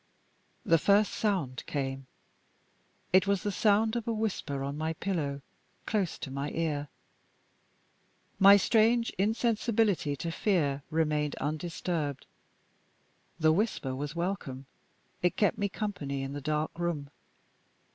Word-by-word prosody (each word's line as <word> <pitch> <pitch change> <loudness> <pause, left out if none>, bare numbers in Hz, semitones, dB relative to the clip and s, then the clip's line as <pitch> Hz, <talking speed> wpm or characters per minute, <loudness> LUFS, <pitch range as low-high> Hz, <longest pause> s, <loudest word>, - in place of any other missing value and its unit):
The 165 0 +4
first 200 +5 +4
sound 175 - -1
came. 135 -2 -3 1.1
It 185 +1 +5
was 200 -2 +1
the 205 - 0
sound 215 +3 +3
of 235 -1 -3
a - - +1
whisper 200 -11 -2
on 140 +1 -3
my 160 +2 -2
pillow, 150 -6 -3 0.4
close 200 -6 -1
to 135 - -7
my 140 +2 -3
ear. 150 -3 -1 1.5
My 200 +1 +9
strange 230 +3 +3
insensibility 215 - +1
to 165 +4 -4
fear 155 -8 +1
remained 150 -2 0
undisturbed. 155 -1 -3 1.1
The 155 -1 +5
whisper 170 - -1
was 145 +3 -4
welcome, 170 -7 -3 0.6
it 180 - +1
kept 205 - +2
me 200 0 0
company 150 -11 -3
in 135 +1 -5
the 145 - -5
dark 155 +3 -2
room. 155 -5 -2
165 Hz, 125 wpm, -30 LUFS, 145-205 Hz, 1.5 s, My